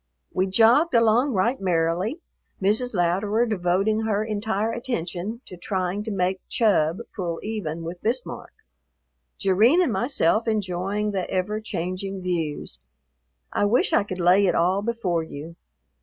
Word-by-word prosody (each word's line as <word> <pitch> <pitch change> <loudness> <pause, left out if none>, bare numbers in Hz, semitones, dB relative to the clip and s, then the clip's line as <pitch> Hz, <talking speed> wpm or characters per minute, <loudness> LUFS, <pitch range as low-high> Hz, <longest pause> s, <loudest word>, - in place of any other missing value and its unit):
We 185 +1 +1
jogged 235 - +4
along 235 +4 +4
right 230 +6 +1
merrily, 180 - 0 0.4
Mrs. 215 +5 +1
Louderer 195 +6 +1
devoting 195 +1 +1
her 215 -1 0
entire 220 0 -1
attention 215 -2 -4
to 180 - -10
trying 185 +1 -2
to 220 - -3
make 185 -1 -1
Chub 190 -4 +2
pull 170 -4 -3
even 170 -7 -4
with 175 +2 -7
Bismarck, 240 +3 -3 0.9
Jerrine 215 - +4
and 340 -11 +2
myself 225 - +1
enjoying 205 0 -1
the 190 -2 -3
ever 210 +4 -1
changing 185 -1 -4
views. 160 - -3 0.7
I - - +2
wish 225 +5 +2
I - - +5
could 190 -2 -6
lay 185 +3 +4
it - - +2
all 185 +4 +2
before 205 -7 -1
you. 160 +1 -8
195 Hz, 140 wpm, -24 LUFS, 180-220 Hz, 0.9 s, I